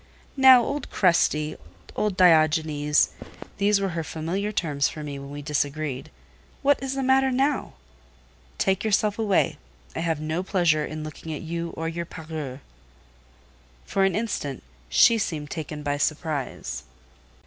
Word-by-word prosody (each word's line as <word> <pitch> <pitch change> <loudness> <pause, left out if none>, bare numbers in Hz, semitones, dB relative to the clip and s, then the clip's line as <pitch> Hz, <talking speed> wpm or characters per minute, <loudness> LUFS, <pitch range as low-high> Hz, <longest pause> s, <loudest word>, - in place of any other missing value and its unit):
"Now, 260 -3 +8
old 285 +4 -3
Crusty—old 155 - 0
Diogenes" 155 -3 +4 0.5
(these 200 0 +3
were 195 -1 -1
her 170 -2 -3
familiar 170 +7 -3
terms 150 -8 0
for 155 - -7
me 140 -2 -6
when 140 0 -9
we 145 0 -7
disagreed), 145 -2 -2 0.5
"what 285 -1 +3
is 270 0 -3
the 270 - -1
matter 265 +1 +4
now?" 270 +2 0 0.8
"Take 190 0 +1
yourself 210 0 +1
away. 190 -8 +1 0.4
I - - -2
have 165 -2 -1
no 155 +3 -2
pleasure 175 -5 +2
in 155 0 -5
looking 155 +1 -8
at - - -7
you 170 +1 -3
or 165 - -2
your 170 +1 -3
parure." 155 -6 -7 1.2
For 195 - +1
an 195 - +2
instant, 205 - -3 0.3
she 225 - +5
seemed 150 -7 -3
taken 150 -1 -5
by 145 0 -1
surprise. 150 -2 -2
165 Hz, 140 wpm, -25 LUFS, 150-200 Hz, 1.2 s, Now